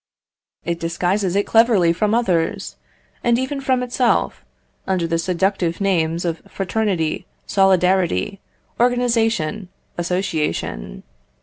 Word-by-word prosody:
It 170 0 -2
disguises 175 +3 -1
it 200 - +2
cleverly 220 -7 +4
from 210 +5 +1
others, 180 -9 0 0.5
and 235 0 +3
even 260 +2 -2
from 260 -2 +1
itself, 250 0 0 0.4
under 185 -3 0
the 165 0 0
seductive 180 0 0
names 170 -4 0
of 165 -1 -2
fraternity, 190 -5 -1 0.2
solidarity, 185 - +2 0.4
organisation, 230 -6 +1 0.3
association. 170 - -2
190 Hz, 100 wpm, -20 LUFS, 170-225 Hz, 0.5 s, cleverly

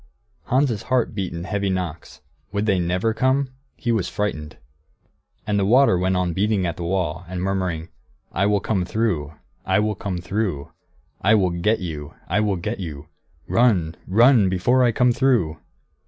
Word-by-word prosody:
Hans' 130 -4 +1
heart 125 +1 0
beat 95 -4 -3
in 85 0 -5
heavy 100 +1 -1
knocks. 90 -4 -4 0.3
Would 100 +1 -1
they 100 -4 +2
never 90 +6 0
come? 130 +3 +1 0.3
He 120 - -1
was 110 -5 0
frightened. 80 -8 -3 0.9
And 105 -1 0
the - - +2
water 125 0 +5
went 90 +1 +1
on 90 -2 0
beating 100 +1 +1
at 85 -2 -2
the 85 - -6
wall, 90 -1 -1
and 90 0 -5
murmuring, 90 -4 -2 0.4
"I 100 +3 +1
will 105 -1 +2
come 95 -3 0
through, 90 -7 -1 0.3
I 95 - +1
will 105 0 +1
come 95 -2 -4
through, 90 -5 -3 0.5
I 110 +3 +5
will 95 -4 +2
get 90 +6 0
you, 75 -5 -6
I 90 +5 +1
will 105 -2 +1
get 85 - -4
you, 75 -5 -7 0.4
run 100 -10 +2
run 115 0 +5
before 120 +8 +2
I 120 - +4
come 125 +2 +3
through!" 115 - +1
95 Hz, 170 wpm, -22 LUFS, 85-110 Hz, 0.9 s, water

